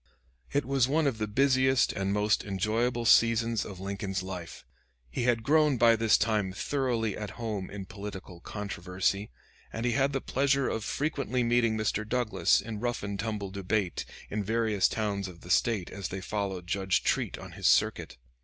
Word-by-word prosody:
It 145 - +1
was 135 -1 +2
one 155 +3 +2
of 130 -5 0
the 105 - -1
busiest 130 +3 +3
and 95 -1 -1
most 105 +1 +2
enjoyable 110 +5 -1
seasons 115 -1 +4
of 95 -3 -8
Lincoln's 95 -1 -3
life. 90 -3 -7 0.5
He 120 - -2
had 120 -2 +2
grown 150 -1 +3
by 115 0 +6
this 110 -1 +4
time 105 -4 0
thoroughly 120 -3 -1
at 105 -1 -5
home 105 -5 -3
in 100 -1 -7
political 95 -3 -8
controversy, 100 +1 -2 0.4
and 115 - -4
he 120 - +2
had 135 +4 +2
the 135 - -1
pleasure 135 0 +1
of 110 - -2
frequently 140 -2 -1
meeting 115 -2 +2
Mr. 110 0 0
Douglas 120 0 +2
in 110 -1 -6
rough 120 -1 -2
and 100 -1 -4
tumble 105 -3 -3
debate 100 -1 -1 0.3
in 105 0 -1
various 110 -1 +2
towns 100 -3 -2
of 85 -2 -12
the 90 - -7
State 105 -3 +1
as 100 -2 -4
they 95 - -5
followed 95 -2 -3
Judge 95 +1 0
Treat - - 0
on - - -10
his - - -1
circuit. 60 - +2
110 Hz, 175 wpm, -29 LUFS, 100-120 Hz, 0.5 s, by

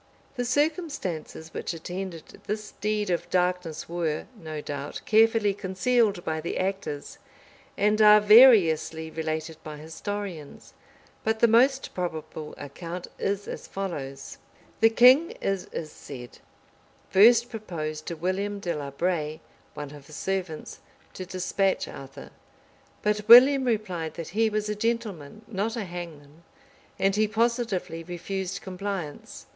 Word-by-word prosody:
The 245 -1 -2
circumstances 255 - -2
which - - -4
attended 175 0 -7
this 210 +1 -4
deed 210 -1 0
of 170 - -2
darkness 180 -3 -1
were, 165 -3 -2
no 155 -6 -7
doubt, 145 -1 -6
carefully 220 -1 +4
concealed 200 0 +1
by 160 0 -2
the 170 - -3
actors, 190 -6 -3 0.6
and 210 +2 +2
are 210 0 +9
variously 200 -8 +6
related 160 0 -4
by 155 -2 -7
historians; 165 0 -7 0.5
but 220 0 +1
the 235 - +5
most 260 +4 +3
probable 160 -3 -5
account 170 +5 -7
is 200 0 -2
as - - -7
follows: 140 -9 -6 0.4
The 225 - +6
king, 255 +8 +6
it 195 -2 -2
is 155 -2 -5
said, 125 -4 -10 0.7
first 235 +4 +6
proposed 155 -8 -5
to 170 - -3
William 195 +5 -2
de 175 -3 -2
la 145 -2 -5
Braye, 155 0 -2 0.4
one 145 -2 -6
of 145 -1 -13
his 155 - -11
servants, 185 -4 -4 0.3
to 185 - -7
despatch 190 +1 0
Arthur; 135 0 -10 0.7
but 210 0 0
William 260 +3 +9
replied 190 -9 -2
that 165 -2 -6
he 220 +5 +2
was 215 0 -2
a 210 - -1
gentleman, 215 -5 -3
not 220 +2 -2
a 230 - -3
hangman; 165 -4 -9 0.6
and 195 0 +2
he 215 +1 +3
positively 220 -7 -1
refused 185 +2 -4
compliance. 185 -5 -6
185 Hz, 130 wpm, -26 LUFS, 160-215 Hz, 0.7 s, are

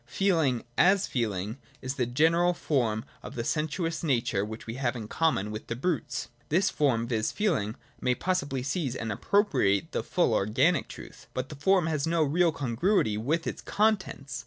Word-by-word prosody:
Feeling, 160 - +1 0.2
as 190 +1 +5
feeling, 110 -1 -2 0.2
is 130 0 -3
the 125 -4 -1
general 165 +7 +3
form 115 -10 0 0.2
of - - -9
the 115 - -2
sensuous 160 +4 -1
nature 120 -9 +1
which 110 +1 -7
we 115 - -5
have 125 -1 -1
in 110 -3 -6
common 110 -9 0
with 105 +1 -7
the 115 - -3
brutes. 145 +1 -2 0.2
This 180 +5 +2
form, 120 -6 +1
viz. 110 -3 0
feeling, 140 - 0 0.2
may 125 -1 +1
possibly 140 -8 -1
seize 135 -2 -2
and 115 -2 -3
appropriate 105 - +2
the - - -1
full - - +1
organic 130 - +2
truth: - - -11
but 130 +1 -3
the 150 - -7
form 180 +5 +3
has 155 -2 -1
no 165 -1 +2
real 165 +4 +3
congruity 140 - +1
with 150 +10 -1
its - - -4
contents. 190 - 0
140 Hz, 175 wpm, -28 LUFS, 115-170 Hz, 0.2 s, as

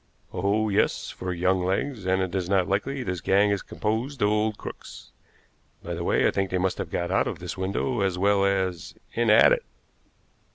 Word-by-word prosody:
"Oh, 100 +4 +1
yes, 100 - 0
for 90 - -5
young 90 +1 +1
legs; 95 +3 -2
and 95 0 +2
it 90 -2 -4
is 95 -2 -2
not 95 -2 +2
likely 130 +8 -1
this 90 -4 -3
gang 100 +2 +3
is 100 - 0
composed 115 +4 -2
of 105 - +4
old 105 0 0
crooks. - - -10 0.7
By - - -4
the - - -4
way, - - +2
I - - +2
think 95 -1 -1
they 90 - 0
must 95 0 -1
have - - -3
got 85 +1 -2
out 95 - +2
of - - -4
this - - -6
window 100 +5 -1
as 95 -2 0
well 100 +1 +3
as 95 -4 -1 0.2
in 120 -1 +1
at 105 - +7
it. - - -1
100 Hz, 205 wpm, -26 LUFS, 95-105 Hz, 0.7 s, at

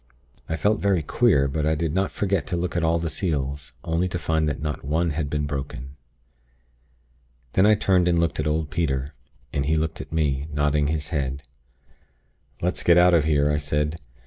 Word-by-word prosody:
I 80 - 0
felt 105 +7 +1
very 95 -5 +1
queer; 75 - +3
but 75 +3 -2
I 80 - +2
did 80 -1 -2
not 95 +1 0
forget 100 -6 -1
to 90 - -2
look 90 +1 -3
at 85 - 0
all 80 +1 +3
the 85 0 -2
seals, 70 -4 -3
only 85 +2 0
to 90 - -3
find 80 -2 0
that 75 - -3
not 75 -1 -4
one 80 +4 0
had 75 -1 -2
been 75 0 -1
broken. 70 -2 -5 1.6
"Then 95 +2 +4
I 110 - +6
turned 95 -3 +2
and 85 -1 +3
looked 85 -3 0
at 75 - 0
old 75 0 -1
Peter, 70 -4 -1 0.4
and 70 - 0
he 80 - +2
looked 80 0 -2
at - - -11
me, 75 -3 0
nodding 75 0 +1
his 75 0 -2
head. 70 -3 -2 1.2
"'Let's 90 +1 0
get 85 0 +5
out 90 0 +6
of 80 -3 +4
here!' 75 -1 +2
I 75 - +1
said. 75 +2 -1
80 Hz, 200 wpm, -24 LUFS, 75-85 Hz, 1.6 s, I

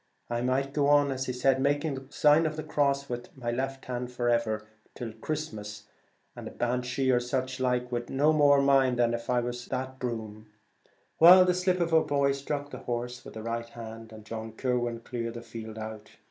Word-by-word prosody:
I 120 0 0
might 135 +2 0
go 145 -1 +2
on 145 -1 +5 0.5
making 145 +2 +1
the 135 0 -8
sign 150 +2 +4
of 155 - -4
the 155 - -5
cross 140 -2 0
with 120 -1 -4
it, - - -20
and - - -14
all 120 +3 0
that, 135 0 -13 1.1
come 115 -3 -6
Christmas, 105 -10 -5 0.5
and - - -8
a - - -5
Banshee, 125 +2 0
or 125 - +4
such 130 +1 -2
like, 125 -1 0
would 120 0 -3
no 145 +3 +3
more 145 -2 +5
mind 135 -2 +4
than 120 -1 +2
if 115 0 -5
it 125 -1 +2
was 120 0 -5
that 130 0 -4
broom.' 110 -3 -5 0.7
Well, 180 +3 +9
the 180 - +3
slip 180 0 +1
of 170 -1 0
a 160 - +6
boy 140 -2 +2
struck 140 +1 -4
the - - -7
horse 120 +1 -4
with - - -11
his 110 0 -7
right 115 0 -3
hand, 115 -1 -9
and 110 -1 -12
John 110 0 -6
Kirwan 120 -1 -1
cleared 115 -1 -5
the 120 - -7
field 110 -2 -8
out. 110 -1 -7
125 Hz, 195 wpm, -28 LUFS, 115-140 Hz, 1.1 s, Well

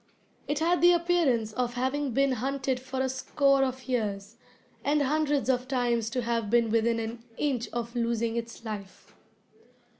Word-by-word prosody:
It 295 - -1
had 340 +3 +2
the 350 0 +7
appearance 330 -11 +1
of 240 +1 -2
having 265 +3 -1
been 275 +3 +2
hunted 260 +1 -1
for 260 +1 -4
a 265 - +1
score 275 +1 +2
of 260 0 -3
years, 210 -6 -2 0.5
and 290 0 +2
hundreds 295 -1 +1
of 255 -1 +1
times 240 -4 0
to 245 +1 -2
have 230 -2 -1
been 235 -1 +3
within 230 +1 +2
an 225 +1 -5
inch 255 -6 -1
of 235 0 -4
losing 235 -1 0
its 230 0 -5
life. 205 -3 -8
250 Hz, 160 wpm, -28 LUFS, 230-275 Hz, 0.5 s, the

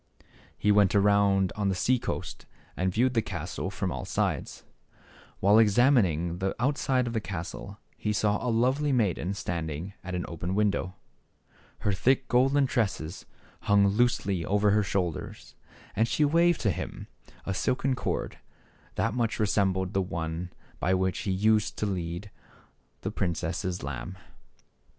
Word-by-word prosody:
He 105 - +2
went 100 -1 +4
around 100 -2 +3
on 105 -2 0
the 95 - 0
sea 125 +7 +2
coast - - -5 0.3
and 95 0 0
viewed 125 +6 +2
the 115 - +2
%3. - - -17
castle - - -4
from - - -3
all - - -4
sides. - - -2 0.8
While 105 +3 +5
examining 100 - +3
the 95 0 -1
outside 130 0 +1
of 120 - -3
the 110 - -1
castle, 100 +2 -6 0.2
he 105 - -1
saw 105 0 +1
a 125 - 0
lovely 130 +6 +2
maiden 100 -6 0
standing 85 -2 -4
at 95 0 -4
an 90 - -2
open 85 +3 -4
window. 100 -3 0 0.9
Her 100 - +1
thick 130 +7 +2
golden 135 +3 +3
tresses 100 -9 -2 0.3
hung 100 -1 +4
loosely 100 -5 +1
over 105 +2 +2
her 105 +1 +4
shoulders, 95 -4 -3 0.4
and 115 - +2
she 150 - +2
waved 170 +3 +3
to 105 - +2
him - - -6 0.4
a 95 - -1
silken 130 +7 0
cord, 125 - -3 0.6
that 115 - 0
much 115 -2 0
resembled 95 -3 +1
the 95 - +2
one 85 0 -4 0.3
by 95 - +2
which 95 0 0
he 100 - -2
used 105 +3 +2
to - - -1
lead 90 0 -4 0.7
the - - -3
princess' 90 0 -2
lamb. 75 +7 -5
100 Hz, 150 wpm, -28 LUFS, 90-115 Hz, 0.9 s, While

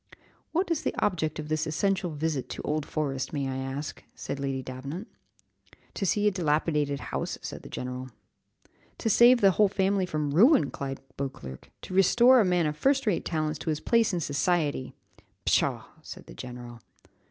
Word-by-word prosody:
"What 350 +2 0
is 320 - +1
the - - -2
object 160 -6 0
of 155 -1 -5
this 155 0 -1
essential 190 +3 0
visit 155 -3 -2
to - - -5
Old 150 0 -2
Forest, 140 -3 -2
may 140 -2 -1
I 130 0 -3
ask?" 135 +3 -5
said 140 - -5
Lady 135 -1 -2
Davenant. 140 - -6 0.9
"To 195 - -2
see 205 +3 +1
a - - +4
dilapidated 150 -4 0
house," - - -2
said - - -6
the - - -11
general. 125 +1 -5 0.9
"To 225 - 0
save 240 +2 +6
a 195 - +7
whole 210 +2 +4
family 195 -1 +1
from 150 -4 -2
ruin," 225 - +5
cried 135 -1 -5 0.2
Beauclerc; 100 - -6
"to - - -7
restore 240 +7 +6
a - - +4
man 180 -2 +2
of 150 0 -1
first 270 - +2
rate 205 -6 0
talents 155 -2 -1
to - - -4
his 155 -1 0
place 230 +3 +2
in 175 -2 -1
society." 145 -2 0 0.5
"Pshaw!" - - +2 0.2
said - - -10
the - - -12
general. 120 - -9
155 Hz, 175 wpm, -28 LUFS, 140-195 Hz, 0.9 s, a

